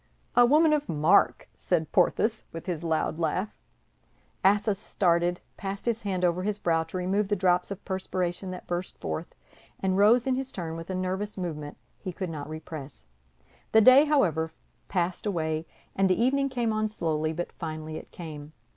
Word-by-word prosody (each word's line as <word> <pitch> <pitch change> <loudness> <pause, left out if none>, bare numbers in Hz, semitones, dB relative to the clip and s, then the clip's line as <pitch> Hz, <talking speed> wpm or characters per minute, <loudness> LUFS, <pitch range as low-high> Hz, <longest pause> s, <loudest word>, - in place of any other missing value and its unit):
"A 245 0 +7
woman 305 +3 +5
of 295 -1 0
mark!" 155 +6 +3
said 160 -4 -1
Porthos, 215 +4 +2
with 165 - -7
his 175 -3 -3
loud 160 0 0
laugh. 185 +5 0 0.9
Athos 205 +1 +3
started, 175 -1 +1 0.2
passed 195 0 -5
his 235 -1 0
hand 185 -3 0
over 175 +1 +1
his 205 +1 -1
brow 165 -5 +1
to 165 +3 -6
remove 190 +3 0
the 205 - +1
drops 180 -2 +2
of 200 -1 -7
perspiration 185 -1 -2
that 180 -1 -7
burst 175 +1 -4
forth, 80 -1 -5 0.4
and 190 0 +1
rose 230 +4 +5
in 265 - +2
his 265 +1 -2
turn 165 -3 -5
with 165 +2 -8
a 185 - -2
nervous 190 +3 -2
movement 150 -5 -5 0.2
he 185 - -5
could 180 -1 -4
not 150 -2 -6
repress. 155 - -8 0.7
The 220 - +7
day, 255 +6 +8
however, 165 - +2 0.4
passed 180 +2 -1
away; 160 -4 -1 0.3
and 195 0 +3
the 185 - +2
evening 275 +3 +2
came 240 -4 0
on 215 0 +1
slowly, 155 -6 -1
but 175 +2 -4
finally 155 -1 -6
it - - -10
came. 155 -3 -9
185 Hz, 175 wpm, -27 LUFS, 165-210 Hz, 0.9 s, day